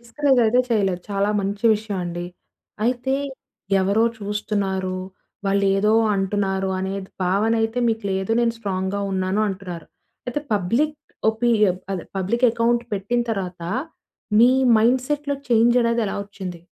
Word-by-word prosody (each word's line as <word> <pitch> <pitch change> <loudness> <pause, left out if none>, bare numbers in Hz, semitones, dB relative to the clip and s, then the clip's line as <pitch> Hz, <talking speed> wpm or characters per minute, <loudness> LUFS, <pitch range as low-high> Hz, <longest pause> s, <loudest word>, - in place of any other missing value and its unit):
Discourage 265 +3 +1
అయితే 245 +3 +4
చేయలేదు. 195 -5 +1
చాలా 200 +1 +1
మంచి 200 +3 -4
విషయం 210 -2 -4
అండి. 175 0 -4 0.6
అయితే, 250 +2 0 0.7
ఎవరో 200 +4 +2
చూస్తున్నారు? 200 -2 -2 0.5
వాళ్లేదో 200 +1 +2 0.2
అంటున్నారు? 195 0 0
అనేది 190 0 -4 0.2
భావన 200 +5 +2
అయితే 225 +2 -1
మీకు 225 -2 -1
లేదు 190 +3 -1
నేను 230 -1 +2
స్ట్రాంగ్‍గా 195 -1 -2
ఉన్నాను 190 +2 0
అంటున్నారు. 180 -4 -6 0.4
అయితే 250 +4 -2
పబ్లిక్ 235 +11 +1 0.3
ఒపీరియం 220 -4 +2
అదే 185 -3 -2
పబ్లిక్ 215 +7 0
అకౌంట్ 235 +1 +1
పెట్టిన 205 +5 0
తర్వాత 185 -4 -4 0.8
మీ 240 +2 +7 0.3
మైండ్‌సెట్‌లో 260 +5 +1
చేంజ్ 235 +1 +4
అనేది 235 0 +1
ఎలా - - -3
వచ్చింది? 185 -4 -8
205 Hz, 125 wpm, -22 LUFS, 190-235 Hz, 0.8 s, మీ